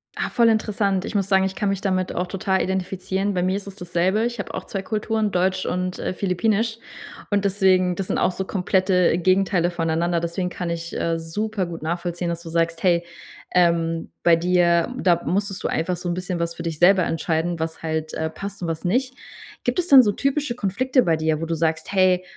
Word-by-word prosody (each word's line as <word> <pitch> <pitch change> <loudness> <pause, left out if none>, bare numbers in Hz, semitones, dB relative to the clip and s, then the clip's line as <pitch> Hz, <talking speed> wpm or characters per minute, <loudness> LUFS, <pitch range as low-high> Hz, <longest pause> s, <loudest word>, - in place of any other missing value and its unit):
Ah, - - -2
voll 235 -2 +5
interessant. 205 -3 0
Ich - - -6
muss 195 -1 0
sagen, 190 -1 +4
ich 190 0 -2
kann 205 - 0
mich 195 0 -2
damit 185 -2 -1
auch 180 - 0
total 190 0 0
identifizieren. 190 +1 -2
Bei 180 - +1
mir 185 +1 +1
ist 200 0 -5
es 195 - -8
dasselbe, 185 +4 0
ich 240 -2 -3
hab - - -4
auch - - -5
2 195 - -4
Kulturen, 215 0 -1
deutsch 185 +1 0
und, 180 0 -2
äh, - - -2
philippinisch, 215 +5 0 0.5
und 205 -1 +1
deswegen 185 -2 +3
das 190 0 -3
sind - - -1
auch - - +2
so 190 - -4
komplette 185 -2 +2
Gegenteile 185 -1 +2
voneinander, 170 0 0
deswegen 170 +2 -2
kann 175 -1 -4
ich, 170 0 -5
äh, 165 0 0
supergut 175 -1 -3
nachvollziehen, 170 +1 -2
dass 170 0 -3
du 165 - -9
sagst, 165 0 0
hey, 175 -2 +2 0.5
ähm, 165 -2 +1
bei 170 -1 +6
dir, 170 +3 +2
da 175 -2 +3
musstest 195 +1 -1
du - - +1
einfach 175 +2 -1
so 175 0 -5
'n - - 0
bisschen 180 -1 -3
was 170 0 -2
für 165 - -7
dich 165 -3 -4
selber 185 +1 +6
entscheiden, 165 0 -1
was 160 0 -4
halt, 160 0 -3
äh, 160 0 -2
passt 200 +2 -8
und 170 - -2
was 165 +2 -4
nicht. 255 +8 0 0.5
Gibt - - 0
es 355 - 0
denn 270 -2 +9
so 205 - +2
typische 275 0 -1
Konflikte 250 +5 +1
bei 165 -2 +2
dir, 155 0 0
wo 165 - -1
du 165 0 -2
sagst: 160 0 -1
“Hey, 185 -2 +3
185 Hz, 215 wpm, -23 LUFS, 170-200 Hz, 0.5 s, denn